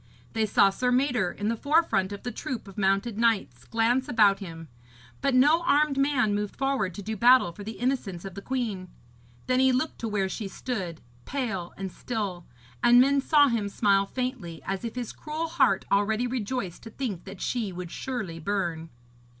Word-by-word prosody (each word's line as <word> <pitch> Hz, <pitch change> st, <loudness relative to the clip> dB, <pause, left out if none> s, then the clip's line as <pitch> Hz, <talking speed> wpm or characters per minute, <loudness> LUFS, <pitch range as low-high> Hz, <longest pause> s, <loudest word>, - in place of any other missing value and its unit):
They 220 Hz, -1 st, +1 dB
saw 200 Hz, -1 st, +5 dB
Sir 250 Hz, +5 st, 0 dB
Mador, 250 Hz, -7 st, +2 dB
in 205 Hz, -, -4 dB
the 230 Hz, -, 0 dB
forefront 285 Hz, -, +2 dB
of 200 Hz, -, -7 dB
the 245 Hz, -, -3 dB
troop 230 Hz, 0 st, -5 dB
of 195 Hz, -, -11 dB
mounted 200 Hz, +2 st, 0 dB
knights, 195 Hz, -, +1 dB
glance 235 Hz, -, +1 dB
about 205 Hz, -4 st, +4 dB
him; 165 Hz, -4 st, -8 dB, 0.5 s
but 275 Hz, -2 st, +1 dB
no 295 Hz, +6 st, +5 dB
armed 300 Hz, -3 st, +3 dB
man 275 Hz, -6 st, +2 dB
moved 205 Hz, 0 st, -2 dB
forward 265 Hz, -10 st, -1 dB
to 205 Hz, -, -7 dB
do 220 Hz, +3 st, -3 dB
battle 240 Hz, -3 st, +5 dB
for 205 Hz, +4 st, -10 dB
the 220 Hz, +2 st, -5 dB
innocence 235 Hz, -9 st, -2 dB
of 195 Hz, -, -6 dB
the 200 Hz, -, -7 dB
queen. 220 Hz, -7 st, -3 dB, 0.6 s
Then 255 Hz, 0 st, +2 dB
he 265 Hz, 0 st, +5 dB
looked 255 Hz, +5 st, -1 dB
to 230 Hz, -, -3 dB
where 205 Hz, -3 st, 0 dB
she 200 Hz, +2 st, -4 dB
stood, 190 Hz, -6 st, -5 dB, 0.2 s
pale 220 Hz, -11 st, -3 dB
and 190 Hz, -1 st, -5 dB
still, 200 Hz, -8 st, -4 dB, 0.4 s
and 240 Hz, 0 st, +7 dB
men 275 Hz, +2 st, +4 dB
saw 290 Hz, 0 st, +5 dB
him 225 Hz, -5 st, 0 dB
smile 200 Hz, -1 st, +2 dB
faintly, 245 Hz, -, -4 dB
as 195 Hz, +2 st, -3 dB
if 230 Hz, 0 st, -5 dB
his 245 Hz, -3 st, -4 dB
cruel 310 Hz, +2 st, -4 dB
heart 320 Hz, -, +2 dB
already 215 Hz, +4 st, +2 dB
rejoiced 245 Hz, -6 st, -3 dB
to 225 Hz, -, -9 dB
think 220 Hz, -8 st, -5 dB
that 195 Hz, -1 st, -9 dB
she 230 Hz, -6 st, -2 dB
would 180 Hz, -1 st, -7 dB
surely 215 Hz, -11 st, -4 dB
burn. 165 Hz, -3 st, -2 dB
220 Hz, 190 wpm, -27 LUFS, 195-255 Hz, 0.6 s, and